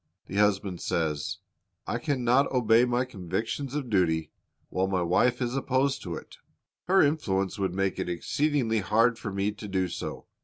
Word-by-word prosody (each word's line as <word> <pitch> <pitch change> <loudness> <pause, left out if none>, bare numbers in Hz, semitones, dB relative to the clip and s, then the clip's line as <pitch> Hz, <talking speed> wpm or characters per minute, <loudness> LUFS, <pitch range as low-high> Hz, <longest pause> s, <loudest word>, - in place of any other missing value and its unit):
The 95 - -5
husband 100 -3 +1
says, 80 -5 -1 0.5
"I - - -2
can 145 -5 -1
not 125 +4 +3
obey 120 -2 +4
my 125 +1 +1
convictions 115 - -4
of 145 -4 -2
duty 80 -5 +1 0.4
while 95 +1 0
my 95 -2 0
wife 120 +9 +2
is 120 +1 -2
opposed 135 0 +1
to 85 -3 -5
it. - - -10 0.5
Her 190 +1 +5
influence 100 - 0
would 95 -2 -1
make 95 -1 0
it - - -2
exceedingly 120 - 0
hard 115 +4 +2
for 105 - -4
me 100 +1 0
to 105 0 -9
do 95 -2 0
so." - - -6
105 Hz, 170 wpm, -28 LUFS, 95-125 Hz, 0.5 s, Her